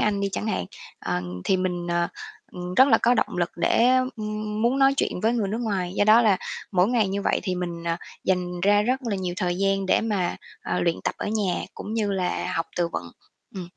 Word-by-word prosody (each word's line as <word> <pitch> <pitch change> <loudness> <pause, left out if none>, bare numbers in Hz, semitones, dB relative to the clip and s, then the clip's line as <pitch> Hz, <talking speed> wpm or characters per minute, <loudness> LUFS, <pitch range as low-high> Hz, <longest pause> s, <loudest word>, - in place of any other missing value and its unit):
Anh 205 -1 +1
đi 200 - 0
chẳng 215 - -3
hạn, 185 - -1 0.3
ờ, 90 0 -2 0.2
thì 190 - +3
mình, 180 -1 -2
ờ, 170 0 +1 0.4
ừm, 180 0 -6
rất 260 +5 +6
là 225 - +5
có 245 +2 +3
động - - 0
lực 175 -1 0
để, 230 +7 +3 0.3
ừm, 215 0 -3
muốn 250 +4 +2
nói 270 0 +5
chuyện 180 - -1
với 225 +2 +3
người 220 -5 0
nước 220 - -2
ngoài, 190 -6 -2
do 205 - +2
đó 220 +3 +7
là 210 -4 +4 0.4
mỗi 185 +2 +3
ngày 230 -5 +2
như 200 +1 -2
vậy - - +1
thì 185 -3 -1
mình, 175 -2 -4
ờ, 165 0 0 0.3
dành 180 -1 -1
ra 205 +2 +4
rất 255 +5 0
là 220 -5 -2
nhiều 180 -2 -3
thời 180 -2 -1
gian 195 0 +1
để - - +3
mà, 205 -5 -1 0.3
ờ, - - -1
luyện 170 -1 +1
tập - - 0
ở - - -3
nhà, 205 -4 0
cũng 215 - -6
như 210 -3 0
là 180 -2 -1
học 165 - -1
từ 175 -1 +1
vựng. 85 - -5 0.4
Ừm. 185 -2 -5
195 Hz, 235 wpm, -25 LUFS, 180-215 Hz, 0.4 s, đó